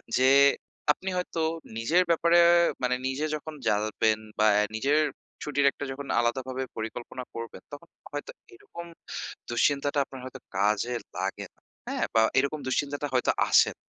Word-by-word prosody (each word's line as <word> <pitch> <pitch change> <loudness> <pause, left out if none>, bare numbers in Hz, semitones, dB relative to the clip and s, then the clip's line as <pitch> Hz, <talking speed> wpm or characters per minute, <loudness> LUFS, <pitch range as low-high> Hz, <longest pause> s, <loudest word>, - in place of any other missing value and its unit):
M - - -31
যে 130 +1 +5 0.6
আপনি 190 - -8
হয়তো 180 -2 -2 0.4
নিজের 160 +11 +3
ব্যাপারে 170 +1 +4 0.4
মানে 125 0 +1
নিজে 135 +3 -2
যখন 155 +1 -8
জানবেন 110 +1 +1 0.2
বা 110 - +4
অ্যা 105 - +4
নিজের 140 +7 +2 0.4
ছুটির 145 -1 +1
একটা - - -6
যখন 140 +1 -7
আলাদাভাবে 130 +2 -1
পরিকল্পনা 120 +3 -6
করবেন 115 0 -7
তখন 145 +4 -10 0.2
হয়তো 485 - -5 0.2
এরকম 365 - -10 0.6
দুশ্চিন্তাটা 140 +4 +1
আপনার 135 -1 -11
হয়তো 130 0 -9 0.2
কাজে 105 +4 +1 0.2
লাগে - - -3
না। - - -36 0.3
হ্যাঁ? - - -1
বা 110 - +5 0.2
এরকম 140 +3 0
দুশ্চিন্তাটা 145 +2 -1
হয়তো 125 - +3 0.2
আসেন - - +5
130 Hz, 145 wpm, -27 LUFS, 120-150 Hz, 0.6 s, যে